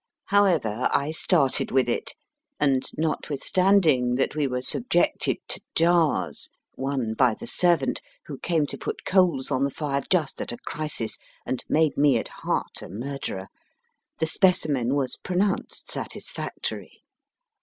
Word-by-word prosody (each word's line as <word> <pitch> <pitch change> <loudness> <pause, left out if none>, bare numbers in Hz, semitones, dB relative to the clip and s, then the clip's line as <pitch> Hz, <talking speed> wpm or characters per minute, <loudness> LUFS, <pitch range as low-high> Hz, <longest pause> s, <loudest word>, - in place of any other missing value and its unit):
However, 165 - +2
I 140 +2 +1
started 155 -4 +2
with 130 -2 +2
it, 120 - -2 0.4
and 135 -3 +2
notwithstanding 155 -3 +2
that 135 +3 0
we 150 -2 +1
were 125 -1 -3
subjected 175 - +2
to - - 0
jars 165 -1 +2 0.2
(one 130 -4 -2
by 120 -1 +3
the - - -9
servant, 170 -7 +2 0.2
who 140 -3 -8
came 165 -4 +1
to - - -7
put - - -5
coals 175 -9 +2
on 130 0 +1
the 140 - +2
fire, 140 -1 -2
just 165 -7 +1
at - - -4
a 120 - -6
crisis, 150 -8 -2 0.3
and 130 - -3
made 155 -1 +2
me 145 -1 +4
at - - -4
heart - - -3
a - - -9
murderer), 110 -3 -5 0.7
the - - 0
specimen 150 -8 +3
was 135 -3 -1
pronounced 190 +2 -2
satisfactory. - - -5
145 Hz, 140 wpm, -25 LUFS, 130-170 Hz, 0.7 s, me